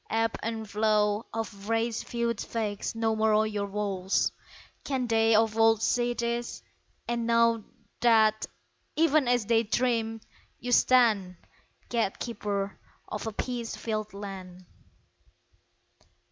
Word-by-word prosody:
Ebb 225 0 +1
and 225 -1 -4
flow 210 +1 +1
Of 210 -2 -5
race 225 0 0
feuds 235 -2 -2
vex 215 -2 -3
no 225 -1 +1
more 220 0 +3
your 205 -2 -2
walls. 195 -2 0 0.5
Can 265 -3 -1
they 225 -1 +3
of 220 0 +3
old 225 -1 +4
see 240 +1 +1
this? 235 0 -3 0.4
and 235 -1 -1
know 230 -1 +3 0.3
That, 220 -2 +4 0.5
even 310 -4 +3
as 245 -3 +2
they 225 +1 +3
dreamed, 225 -1 -1 0.3
you 245 - -4
stand 225 -8 +4 0.5
Gatekeeper 205 -3 -2 0.3
of 210 - -4
a - - -2
peace 235 +1 -4
filled 215 -2 -4
land! 185 -3 -8
225 Hz, 120 wpm, -28 LUFS, 210-235 Hz, 0.5 s, old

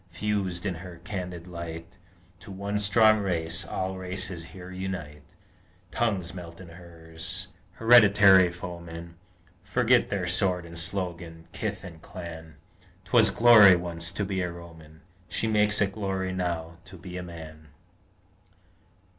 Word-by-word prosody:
Fused 95 0 -2
in 95 - -1
her 85 0 -10
candid 90 -4 -6
light, 85 +2 -8 0.4
To 95 - -14
one 100 +2 -3
strong 110 +1 +5
race 85 -5 -1
all 95 0 -4
races 90 -2 -3
here 90 +1 -11
unite: 90 -6 -6 0.7
Tongues 95 -7 -1
melt 85 -2 -10
in 90 -2 -11
hers, 85 -1 -8 0.2
hereditary 105 -6 +6
foemen 85 -1 -8 0.5
Forget 120 +4 +2
their 100 -3 -2
sword 90 0 0
and 85 0 -11
slogan, 85 -2 -3
kith 105 -2 -4
and 85 -4 -11
clan: 80 -3 -9 0.5
'Twas 110 +1 +5
glory, 110 -4 +8
once, 85 -1 -3
to 100 - -2
be 95 -1 -2
a 90 -1 -2
Roman: 80 -2 -13 0.3
She - - -1
makes 105 -1 +2
it 100 -1 +2
glory, 95 -2 -3
now, 85 -2 -3
to 95 - -12
be 90 +1 -10
a 90 - -4
man! 80 -3 -10
90 Hz, 135 wpm, -27 LUFS, 85-100 Hz, 0.7 s, glory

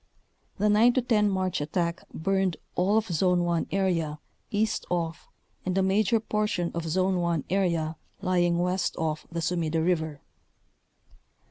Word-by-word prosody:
The 210 - +2
9 220 +4 +5
10 230 -5 +2
March 185 -4 -1
attack 170 +3 -1
burned 190 +1 0 0.2
all 195 +4 +2
of 220 - +2
« - - -12
Zone 180 +1 +2
1 170 -1 0
area 170 -6 0 0.3
east 220 +1 0
of 165 -2 -2 0.4
and 185 +1 -1
a 190 - +3
major 205 +3 +3
portion 210 -5 -1
of 170 -1 -3
Zone 185 +3 +1
1 170 -3 0
area 170 -5 0 0.2
lying 175 -2 +2
west 180 +1 0
of 155 -1 -2
the 170 0 -3
Sumida 165 -2 0
River. 160 -3 0
180 Hz, 145 wpm, -27 LUFS, 165-195 Hz, 0.4 s, 9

